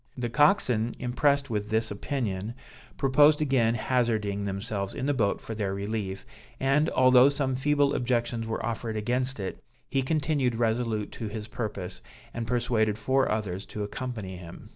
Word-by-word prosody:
The 120 -2 -2
coxswain 125 - +3
impressed 140 +2 +1
with 105 -1 -2
this 110 0 0
opinion, 105 -1 -3 0.4
proposed 145 +2 +5
again 130 -6 +2
hazarding 110 -5 0
themselves 100 0 -3
in 130 - -3
the 145 - +2
boat 110 -7 +1
for 115 - -7
their 100 -3 -2
relief, 100 -1 -4 0.3
and, 140 +4 +3
although 130 +1 +6
some 135 -2 -1
feeble 145 +1 +2
objections 120 -2 0
were 110 - -2
offered 115 -1 -3
against 125 +4 -1
it, 95 -1 -5 0.3
he 135 - +2
continued 145 -3 0
resolute 115 -2 0
to 110 - -5
his 105 0 -6
purpose, 100 -6 -5 0.3
and 115 -1 -4
persuaded 110 -3 +1
four 130 +5 +1
others 100 -3 -2
to 105 - -4
accompany 105 -4 -5
him. 85 -2 -11
115 Hz, 155 wpm, -28 LUFS, 105-130 Hz, 0.4 s, although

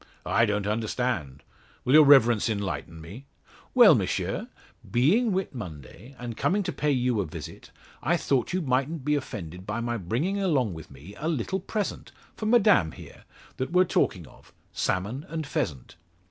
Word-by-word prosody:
"I 115 - +3
don't 105 -1 -1
understand. 105 - -2 0.4
Will 130 - +2
your 155 0 +9
Reverence 120 -6 +5
enlighten 100 -5 -4
me?" 105 - -11 0.5
"Well, - - +9
M'sieu; - - -1 0.4
being 180 - +3
Whit 190 -3 -2
Monday, 95 - -9
and 120 -2 -6
coming 200 - +1
to - - -2
pay 150 - -1
you 125 -5 +1
a - - -2
visit, - - -9 0.3
I 170 +6 +2
thought 135 -5 0
you 185 0 -1
mightn't 135 +2 -1
be 150 - +2
offended 95 - -5
by 110 +2 -2
my 120 0 -2
bringing 125 - -1
along 135 - +1
with 80 -1 -10
me 70 +8 -13
a 155 - -3
little 165 +5 -1
present 205 +2 -4 0.2
for 215 - -4
Madame 210 - +4
here - - -13 0.3
that 130 - -2
we're 180 +1 +5
talking 90 - 0
of 65 - -19 0.2
salmon 105 +10 -2
and 160 0 -4
pheasant." 75 - -4
125 Hz, 165 wpm, -26 LUFS, 100-155 Hz, 0.5 s, your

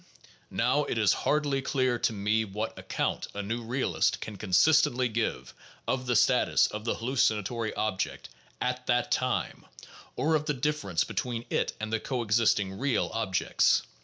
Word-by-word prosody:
Now, - - +1
it - - -3
is - - +4
hardly 145 -2 0
clear 130 -3 0
to - - +1
me 105 +1 0
what 105 +2 -4
account - - -2
a 105 - -3
new 115 +4 -3
realist 120 +4 0
can 110 - -7
consistently 125 - +3
give 115 0 -3 0.3
of 130 -1 -1
the 125 - +1
status - - +4
of 105 +1 -5
the 115 - 0
hallucinatory 115 -2 0
object 105 -3 -2 0.3
at 125 0 -2
that 120 0 +1
time, - - -1 0.5
or 160 +2 +1
of 155 -1 +1
the 150 - 0
difference 135 - 0
between 120 -2 -3
it - - 0
and 110 +1 -4
the 110 - +1
coexisting 105 -6 +1
"real" 135 -2 0
ob 110 -5 -2
jects. - - +3
115 Hz, 160 wpm, -28 LUFS, 105-130 Hz, 0.5 s, is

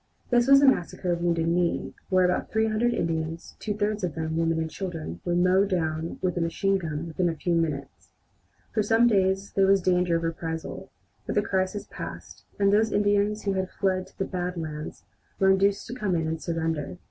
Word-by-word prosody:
This 240 0 +4
was 275 0 +7
the 285 - +6
massacre 180 -6 +1
of 170 0 -1
Wounded 170 -1 +1
Knee, 170 0 0 0.2
where 185 -1 +4
about 180 - 0
300 220 +2 +1
Indians, 165 -4 -3
two 210 -2 -3
thirds 210 0 -1
of 170 -5 -2
them 160 0 -3
women 165 0 +1
and 160 0 -1
children, 160 - -6
were 175 - 0
mown 185 +3 +4
down 160 -3 -2
with 180 -1 0
machine 185 +4 +1
guns 160 -2 -4
within 175 +2 0
a 165 - -3
few 175 +2 -1
minutes. 150 -5 -2 0.6
For 215 - +2
some 225 +3 +4
days 195 -3 +2
there 195 -1 +3
was 195 0 +5
danger 180 -1 +2
of 165 - -1
a 165 - +1
reprisal, 165 0 -6 0.4
but - - -2
the 205 - +3
crisis 190 +1 -1
passed, - - -8
and 200 0 +3
those 220 +1 +3
Indians 205 +1 +1
who 200 - 0
had 190 -1 -1
fled 185 -1 -1
to - - -23
the 195 - -1
"Bad 180 -1 -3
Lands" 155 -2 -6 0.3
were 190 0 +4
induced 195 +1 +2
to 240 - -7
come 210 -8 -1
in 165 -1 0
and 160 0 -3
surrender. 165 -2 -2
180 Hz, 205 wpm, -26 LUFS, 165-200 Hz, 0.6 s, was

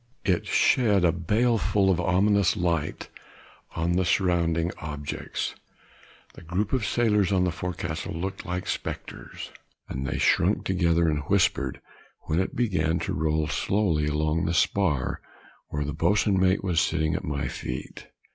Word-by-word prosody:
It 90 -3 +1
shed 105 -7 +3
a 85 - +5
baleful 105 +2 +2
and 90 - +1
ominous 100 +1 +2
light 85 -3 -1 0.7
on 85 +1 0
the 90 +2 +2
surrounding 85 -2 +1
objects; 75 -2 -4 0.8
the - - -13
group 90 +7 -2
of 130 -4 +1
sailors 105 -5 +2
on 95 -2 +3
the 90 - +1
forecastle 85 -2 -4
looked 95 +3 -4
like 90 0 -4
spectres, - - -6 0.4
and 65 0 -4
they - - -2
shrunk - - +2
together, 85 -3 +2
and 75 -2 +1
whispered 75 -8 +1 0.4
when 80 +2 -1
it 95 - -2
began 85 -9 +1
to - - -2
roll 80 0 0
slowly 80 -1 0
along 75 +3 0
the 85 - 0
spar 85 -9 +1 0.5
where 75 0 -3
the 75 - -3
boatswain 95 +3 +2
was 90 -4 +2
sitting 80 -2 0
at - - -2
my 70 -5 -2
feet. 60 0 -6
85 Hz, 145 wpm, -26 LUFS, 80-95 Hz, 0.8 s, a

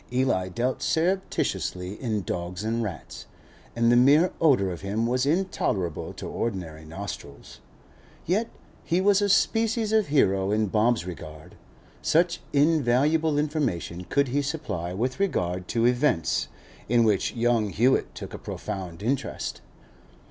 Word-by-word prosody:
Eli 125 -8 +1
dealt 120 +7 -2
surreptitiously 160 - -1
in 110 -6 -1
dogs 90 +2 -4
and 115 +2 -1
rats, 105 -7 -6 0.5
and 115 0 +3
the - - +5
mere 145 +8 +5
odour 125 - +4
of 85 - -7
him 105 +4 -1
was 125 +3 +1
intolerable 145 - -1
to - - -8
ordinary 85 -8 -4
nostrils; 80 -4 -8 0.7
yet 210 +7 0 0.3
he 170 - +1
was 200 +1 +4
a 205 - +1
species 225 +2 +2
of 220 -2 +3
hero 100 -9 +2
in 110 +1 +2
Bob's 110 -1 +1
regard, 80 -3 -9 0.5
such 170 +2 +2
invaluable 150 +1 +3
information 145 - -1
could 140 +4 +1
he 140 +3 +1
supply 110 - -3
with 125 - -2
regard 90 - -1
to 115 0 +1
'events' 125 - +1 0.4
in 120 0 +4
which 105 0 +1
young 115 -2 +2
Hewett 120 +8 +1
took - - -8
a - - -6
profound 95 -4 -6
interest. 130 +4 -2
120 Hz, 135 wpm, -26 LUFS, 95-150 Hz, 0.7 s, the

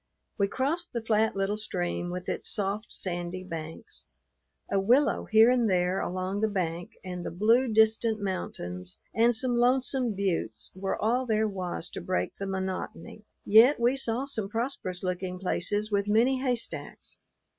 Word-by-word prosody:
We 200 - +3
crossed 295 - -2
the 235 -2 -3
flat 220 -1 +2
little 195 +2 0
stream 175 -4 -3
with 180 +1 -5
its - - -3
soft 205 +2 -2
sandy 175 0 -4
banks. 165 -3 -7 0.6
A 200 - +3
willow 250 +9 +3
here 220 +2 +6
and 240 -3 +2
there 180 0 +2
along 185 +3 -2
the 220 - +2
bank 175 -3 -3
and 180 -1 -5
the - - -3
blue, 225 +8 +3
distant 220 0 +3
mountains 90 - -4 0.2
and 235 +1 +4
some 240 +2 0
lonesome 250 -1 +2
buttes 175 - -2
were 190 +1 -3
all 245 +4 +1
there 220 -1 +2
was 185 -4 -4
to - - -6
break 90 +1 -1
the 195 - -4
monotony. 190 +1 -5 0.2
Yet 230 +7 +7
we 240 +3 +3
saw 255 -1 -2
some 220 -8 -4
prosperous 225 -6 -3
looking 180 0 -2
places 205 +3 -1
with 200 0 +1
many 240 +5 +3
haystacks. 250 -3 -4
205 Hz, 155 wpm, -28 LUFS, 185-230 Hz, 0.6 s, Yet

